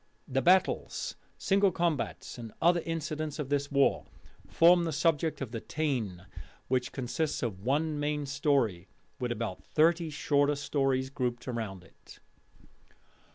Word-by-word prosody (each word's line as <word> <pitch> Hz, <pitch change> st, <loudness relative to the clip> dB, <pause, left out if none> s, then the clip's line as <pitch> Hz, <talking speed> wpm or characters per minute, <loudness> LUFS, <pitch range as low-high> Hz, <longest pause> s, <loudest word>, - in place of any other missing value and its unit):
The 135 Hz, +1 st, 0 dB
battles, 185 Hz, +4 st, +2 dB, 0.2 s
single 200 Hz, 0 st, +3 dB
combats, 165 Hz, -7 st, -2 dB
and 115 Hz, -2 st, -7 dB
other 170 Hz, +1 st, +4 dB
incidents 155 Hz, -2 st, -3 dB
of 150 Hz, -4 st, -4 dB
this 140 Hz, 0 st, 0 dB
war, 140 Hz, -1 st, +2 dB, 0.4 s
form 175 Hz, +1 st, +5 dB
the 165 Hz, -, -1 dB
subject 160 Hz, 0 st, +1 dB
of 130 Hz, -5 st, -4 dB
the 115 Hz, -2 st, -4 dB
Táin, 115 Hz, -, -2 dB, 0.4 s
which 125 Hz, 0 st, 0 dB
consists 140 Hz, +4 st, -2 dB
of 105 Hz, -6 st, -3 dB
one 150 Hz, +4 st, 0 dB
main 145 Hz, 0 st, -1 dB
story, 135 Hz, -, 0 dB, 0.3 s
with 125 Hz, -1 st, -2 dB
about 115 Hz, -5 st, -4 dB
thirty 165 Hz, +1 st, +2 dB
shorter 145 Hz, -1 st, +2 dB
tales 135 Hz, -2 st, 0 dB
grouped 125 Hz, -3 st, -2 dB
round 110 Hz, -7 st, -4 dB
it. -, -, -17 dB
145 Hz, 135 wpm, -30 LUFS, 125-155 Hz, 0.4 s, form